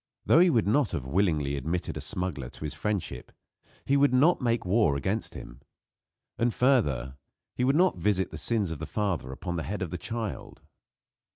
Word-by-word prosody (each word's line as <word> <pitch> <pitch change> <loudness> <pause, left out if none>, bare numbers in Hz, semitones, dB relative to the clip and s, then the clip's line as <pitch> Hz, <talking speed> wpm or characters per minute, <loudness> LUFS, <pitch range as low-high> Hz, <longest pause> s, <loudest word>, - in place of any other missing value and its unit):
Though - - +6
he 180 +1 +6
would 115 -10 +2
not 135 +7 +2
have 65 - -3
willingly 75 -3 +1
admitted 80 +6 -3
a - - -5
smuggler 85 -9 -3
to - - -11
his 75 - -3
friendship, 105 -4 -3 0.5
he 140 - +2
would 140 -2 +4
not 155 +7 +4
make 120 -3 0
war 95 -5 +3
against 95 +10 -3
him. - - -10 0.8
And, 120 +1 +2
further, 75 - +1 0.4
he 125 - -1
would 135 +3 +3
not 180 - +3
visit 95 0 +1
the - - -6
sins 105 -7 0
of 80 - -5
the 80 - -5
father 95 - -2
upon 85 +6 -5
the - - -1
head 100 +4 -3
of 85 - -5
the 90 - -4
child. 110 -2 -5
95 Hz, 190 wpm, -28 LUFS, 80-120 Hz, 0.8 s, Though